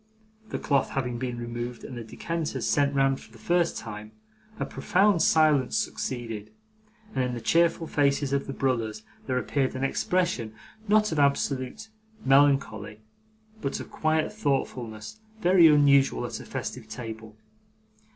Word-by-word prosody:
The - - -3
cloth 140 -2 +1
having 125 -3 -2
been 125 -1 -3
removed 120 0 -5
and 125 - -8
the 120 - -6
decanters 165 +8 -4
sent 140 -1 +2
round 135 -1 +2
for - - -16
the 115 - -15
first 170 +9 +1
time, 105 -1 -8 0.5
a - - -1
profound 200 -2 +2
silence 150 -5 +3
succeeded, 115 -5 -3 0.6
and 130 - 0
in 125 -1 -2
the - - -4
cheerful 165 +8 +2
faces 140 -2 +1
of 140 - 0
the - - -3
brothers 115 -6 -1 0.2
there 130 -1 0
appeared 130 +1 -1
an 130 - -3
expression, 135 -6 0 0.3
not 210 0 +3
of 160 - -1
absolute 140 - 0 0.4
melancholy, 135 -7 +2 0.6
but 140 - -2
of - - -9
quiet 155 +3 0
thoughtfulness 130 - -3 0.2
very 180 -4 +6
unusual 140 - +4
at - - -5
a - - -10
festive - - -6
table. 110 -3 -8
135 Hz, 145 wpm, -27 LUFS, 120-155 Hz, 0.6 s, very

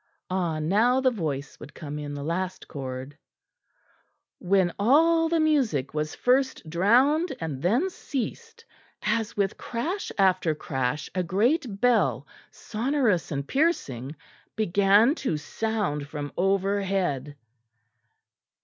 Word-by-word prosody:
Ah! 175 -4 0
now 210 +11 +3
the 260 -1 +3
voice 150 - -4
would 150 - -12
come 150 -2 -6
in 145 -1 -5
the 140 - -5
last 180 +4 -3
chord 130 0 -6 1.2
when 185 -2 +2
all 325 +9 +4
the 335 0 +2
music 265 - +1
was 155 0 -2
first 260 -6 +1
drowned 255 - +3
and 150 -5 -4
then 235 - +2
ceased, 455 - -6 0.4
as 225 +1 -1
with 200 -2 0
crash 330 - -3
after 185 -5 +3
crash 135 -1 -2
a 185 - 0
great 210 - 0
bell, 245 -1 +2 0.2
sonorous 230 - -1
and 140 -1 -3
piercing, 150 - 0 0.4
began 205 +4 +4
to 255 - -2
sound 180 -3 -2
from 145 -1 -6
overhead. 195 -7 0
195 Hz, 115 wpm, -26 LUFS, 150-250 Hz, 1.2 s, all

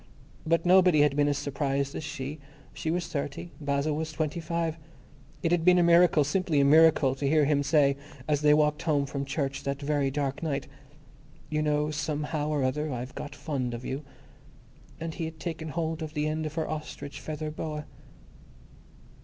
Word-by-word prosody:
But 165 +1 +2
nobody 180 -4 +6
had 145 -1 +3
been 145 0 +3
as 145 -1 +1
surprised 140 -1 -1
as - - -5
she. 145 0 -5 0.3
She 160 - -4
was 170 +1 -1
thirty. 145 +2 -4
Basil 145 +1 0
was 160 +1 -3
twenty 155 +1 -2
five. 165 0 -2 0.6
It 165 - +1
had 175 -2 +2
been 180 +1 +6
a 175 - +5
miracle, 170 -2 +5
simply 155 0 +1
a 140 - +4
miracle, 155 -2 +6
to 135 +1 -2
hear 155 -1 +4
him 145 0 +2
say, 140 -1 +3 0.3
as 150 -2 +1
they 150 0 +5
walked 150 0 +2
home 145 -4 +1
from 140 0 -4
church 135 -1 -2
that 140 0 -3
very 145 -1 0
dark 140 -1 -2
night, 150 -4 -2 0.9
"You 155 0 +1
know, 150 0 +1
somehow 150 0 -2
or 150 -3 0
other, 150 +4 -1
I've 125 +1 -5
got 145 - -7
fond 130 -6 -3
of 120 - -8
you." 135 +3 -4 1.0
And 165 0 -4
he 165 - -3
had 160 0 -7
taken 160 -1 -4
hold 160 +1 -2
of 155 0 -6
the 150 0 0
end 155 0 -2
of 155 - -8
her 160 - -1
ostrich 155 -2 -6
feather 155 0 -5
boa. 150 -1 -5
150 Hz, 185 wpm, -28 LUFS, 140-160 Hz, 1.0 s, nobody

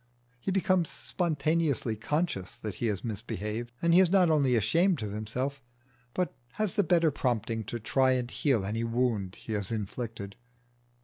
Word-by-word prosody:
He 125 - -3
becomes 185 -3 +2
spontaneously 150 -2 0
conscious 150 - -2
that 105 -2 -5
he 115 - -2
has 100 -4 -1
misbehaved, 110 +1 -4
and 170 0 +4
he 175 - +8
is 190 -2 +6
not 180 -3 +5
only 140 -5 +3
ashamed 165 - +2
of 105 - -3
himself, 125 +7 -3 0.5
but 180 -1 0 0.2
has 215 -3 -1
the 205 -2 +3
better 170 -2 +3
prompting 115 -5 -1
to 120 - -4
try 130 +4 +3
and 125 -1 -1
heal 130 -10 +1
any 110 +3 -1
wound 115 -5 0
he 110 - -6
has 100 -1 -2
inflicted. 105 -1 -4
125 Hz, 165 wpm, -29 LUFS, 110-165 Hz, 0.5 s, he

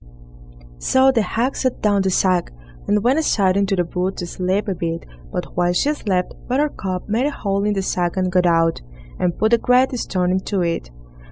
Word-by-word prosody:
So 265 - +4
the 235 -4 +2
hag 235 +5 -1
set 255 -2 -1
down 205 -2 +3
the 190 - +1
sack, 185 -1 +1 0.4
and 210 0 +2
went 260 +6 +3
aside 195 -11 +2
into 200 0 +1
the 175 -2 0
wood 180 +3 -2
to 175 - -4
sleep 185 +4 -1
a 195 - 0
bit, 165 -1 -4 0.3
but 180 - -5
while 175 0 +2
she 290 +11 +2
slept, 185 -10 -1
Buttercup 245 -9 -2
made 230 +6 +1
a - - +1
hole 200 -8 -2
in 210 - +1
the 195 -1 -1
sack 175 -1 -1
and 185 -1 0
got 180 0 +3
out, 165 -1 +2 0.4
and 175 -2 0
put 220 +2 +2
a 235 - +5
great 250 +2 +3
stone 180 -4 -1
into 190 +1 -1
it. 165 - -2
195 Hz, 200 wpm, -20 LUFS, 180-225 Hz, 0.4 s, a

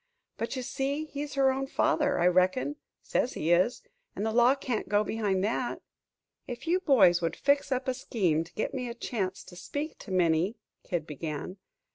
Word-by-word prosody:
But 230 - -3
you 255 - -3
see 280 +5 -2
he's 290 -1 -6
her 270 -1 +4
own 270 +1 -2
father, 295 -1 +1
I - - +3
reckon 185 +11 +2 0.3
says 250 - 0
he 160 - -1
is 185 - +3 0.3
and 205 - -2
the 220 - 0
law 245 +3 +5
can't 250 -7 -3
go 205 +1 +3
behind 205 -4 0
that." 235 +4 -1 0.6
"If 245 +1 -6
you 350 +3 +2
boys 195 - +5
would 165 - -1
fix 280 0 +1
up 255 0 -1
a 260 - +2
scheme 185 - 0
to 165 +1 -17
get 215 - -2
me 250 -3 -3
a 235 - -6
chance 195 -6 -3
to 180 - -13
speak 290 - -5
to - - -11
Minnie 180 +2 +2 0.2
" - - -54
Kid 170 -3 -2
began. 155 +4 -5
235 Hz, 195 wpm, -29 LUFS, 185-270 Hz, 0.6 s, law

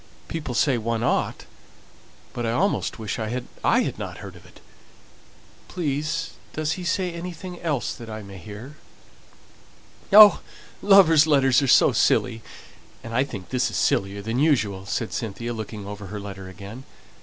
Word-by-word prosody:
"People 150 -7 -5
say 130 -1 +2
one 115 +1 -2
ought, - - -1 0.9
but 120 - -4
I 115 - 0
almost 195 +10 0
wish 110 +1 -4
I 110 - -2
hadn't 125 +2 -7 0.5
heard - - -10
it. - - -17 1.1
Please, 155 -1 -2 0.2
does 155 0 -2
he 185 - -4
say 180 0 -1
anything 175 +1 -7
else 150 -7 -1
that 115 -1 -10
I 110 -1 -7
may 100 -1 -11
hear?" 110 - -10 1.3
"Oh, 210 0 +9 0.4
lovers' 165 -6 +6
letters 135 -3 +4
are 140 - 0
so 130 - +6
silly, 115 -2 +1 0.6
and 115 - -8
I 125 +3 +3
think 100 -9 -8
this 125 -1 0
is - - -4
sillier 100 -7 0
than 115 +4 -2
usual," 110 -11 +1
said 115 +3 -3
Cynthia, 115 +2 -4
looking 110 -2 -7
over 100 0 -8
her 105 +2 -6
letter 95 -2 -8
again. 100 +7 -10
120 Hz, 150 wpm, -24 LUFS, 105-155 Hz, 1.3 s, Oh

